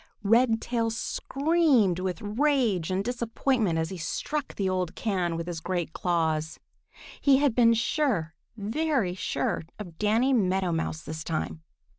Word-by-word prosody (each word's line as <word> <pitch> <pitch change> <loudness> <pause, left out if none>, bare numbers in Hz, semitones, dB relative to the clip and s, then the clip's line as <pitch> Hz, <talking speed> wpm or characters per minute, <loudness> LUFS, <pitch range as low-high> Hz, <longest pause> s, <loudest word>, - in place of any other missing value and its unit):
Redtail 230 +1 +2
screamed 270 - +1
with 185 -1 -3
rage 225 - +1
and 190 +1 -1
disappointment 235 -5 0
as 160 +1 -1
he 185 - -6
struck 280 - -3
the 195 - -1
old 185 -2 -1
can 180 -6 -1
with 165 - -4
his 170 -2 -4
great 175 -1 -3
claws. 160 -3 -1 0.6
He 275 -2 +5
had 280 -3 +2
been 230 -1 +5
sure, 230 - 0 0.2
very 225 - 0
sure 185 - -2 0.2
of 175 -6 -9
Danny 225 +6 +2
Meadow 190 -5 +1
Mouse 160 -1 -2
this 160 +1 -6
time! 160 0 -3
200 Hz, 140 wpm, -27 LUFS, 175-245 Hz, 0.6 s, He